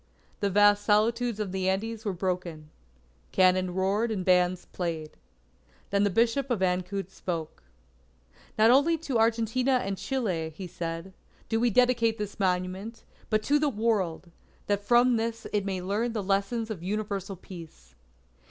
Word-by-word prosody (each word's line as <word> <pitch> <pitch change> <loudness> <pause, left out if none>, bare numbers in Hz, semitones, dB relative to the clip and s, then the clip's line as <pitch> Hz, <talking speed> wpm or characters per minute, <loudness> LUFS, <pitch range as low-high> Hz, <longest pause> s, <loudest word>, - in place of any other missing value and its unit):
The 200 - +1
vast 205 +1 +5
solitudes 225 +2 +2
of 205 -3 -2
the 190 0 0
Andes 220 +4 -2
were 205 - 0
broken. 175 -4 -4 0.6
Cannon 185 -1 +3
roared 200 +5 +1
and 195 -5 -3
bands 180 0 +3
played. 165 -4 -4 0.8
Then 200 0 +3
the 205 - +3
Bishop 235 +7 +1
of 235 -6 0
Ancud 185 +1 -1
spoke: 165 -5 -5 1.0
"Not 220 +2 +6
only 295 +6 +4
to 280 -7 -2
Argentina 230 +3 +2
and 195 -7 -1
Chile," 185 -12 -2
he 190 - -6
said, 170 +1 -5 0.4
"do 225 - +1
we 240 +1 +3
dedicate 230 -1 +3
this 210 -1 -6
monument, 185 +4 -2 0.3
but 215 -1 +1
to 295 +1 +3
the 300 -1 +2
World, 205 -8 -1 0.3
that 205 0 0
from 240 +2 +4
this 230 0 -3
it 205 -2 0
may 190 -2 -3
learn 215 +5 -1
the 215 -3 -2
lesson 200 +4 0
of 190 -6 -5
Universal 200 0 -3
Peace." 165 - -12
200 Hz, 150 wpm, -28 LUFS, 185-230 Hz, 1.0 s, Not